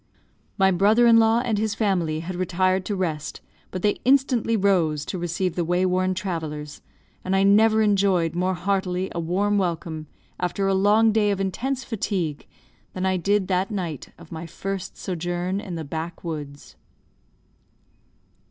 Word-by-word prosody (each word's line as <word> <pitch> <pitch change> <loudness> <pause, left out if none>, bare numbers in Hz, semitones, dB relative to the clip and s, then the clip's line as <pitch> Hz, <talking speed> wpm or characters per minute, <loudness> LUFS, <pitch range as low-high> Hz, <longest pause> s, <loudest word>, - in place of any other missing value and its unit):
My 190 -1 +4
brother 210 +6 +4
in 230 -1 +7
law 225 +1 +4
and 220 -4 0
his 215 -1 -1
family 175 -7 0
had 180 +2 -5
retired 185 +1 +1
to 205 - -2
rest, 160 -5 -3 0.3
but 185 - -6
they 205 -1 +1
instantly 255 -4 +3
rose 170 -7 +2
to 185 - -4
receive 175 +1 -1
the 175 - -1
way 175 +2 +1
worn 185 0 +1
travellers; 155 -6 -5 0.4
and 185 +1 0
I 195 - +3
never 220 +2 +5
enjoyed 195 -5 +2
more 180 +2 0
heartily 185 0 -1
a - - -3
warm 200 +5 +1
welcome 165 -3 -3 0.3
after 180 +2 -1
a 195 - +2
long 210 +3 +4
day 210 -1 +2
of 200 -1 0
intense 250 +8 -2
fatigue, 185 -9 -3 0.5
than 185 0 -2
I 190 0 +1
did 195 +2 +1
that 185 +2 +1
night 175 - -4
of - - -15
my 165 0 -6
first 190 +3 -5
sojourn 175 +1 -3
in 190 -5 -6
the 165 - -4
backwoods. 160 -2 -6
185 Hz, 160 wpm, -24 LUFS, 170-205 Hz, 0.5 s, in